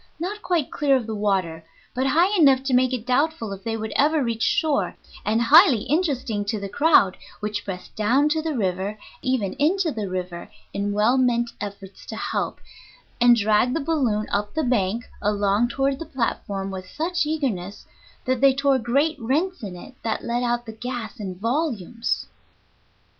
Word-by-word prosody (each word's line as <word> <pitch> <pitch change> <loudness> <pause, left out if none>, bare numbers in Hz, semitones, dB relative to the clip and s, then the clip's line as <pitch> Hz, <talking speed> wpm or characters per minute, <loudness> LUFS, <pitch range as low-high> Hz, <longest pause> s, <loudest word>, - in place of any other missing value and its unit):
not 400 +5 -4
quite 345 -8 0
clear 280 -2 +2
of 255 -3 0
the 220 - -4
water, 190 -6 -1 0.3
but 260 +1 0
high 345 +9 +3
enough 275 -7 +5
to 270 -1 -1
make 255 0 +4
it 245 -3 -3
doubtful 255 -4 0
if 195 0 -10
they 225 +1 -2
would 220 -1 -5
ever 300 +1 +3
reach 230 -2 -2
shore, 305 +2 +1 0.3
and 220 +2 +1
highly 280 - +7
interesting 265 - 0
to 205 +1 -2
the 200 - -4
crowd 235 - +4 0.2
which 210 0 -3
pressed 185 -2 -7
down 245 +7 +3
to 315 +1 +1
the 310 -3 -2
river, 190 0 -1 0.2
even 250 -7 0
into 335 +3 +2
the 210 -7 -4
river, 180 -1 -5 0.2
in 200 +1 -1
well 215 +6 +3
meant 240 -2 +1
efforts 200 -1 -8
to - - -7
help, - - -3 0.6
and 240 0 +7
dragged 220 +3 +2
the - - +1
balloon 260 -9 0
up 205 +3 -1
the 315 - +1
bank 230 -2 0
and 210 +1 +1
along 205 +3 +2
toward 270 +2 -1
the 330 - -5
platform 200 -6 -3
with 185 -1 -7
such 335 0 -1
eagerness 220 - -3 0.4
that 255 -1 0
they 275 -1 +5
tore 275 -1 +2
great 280 +6 +1
rents 305 +8 0
in 195 -5 -6
it 180 +9 -11
that 225 -1 -2
let 240 +1 -1
out 240 0 -1
the 220 - -7
gas 240 -1 -6
in 190 -3 -5
volumes. 230 - -2
240 Hz, 180 wpm, -23 LUFS, 205-280 Hz, 0.6 s, highly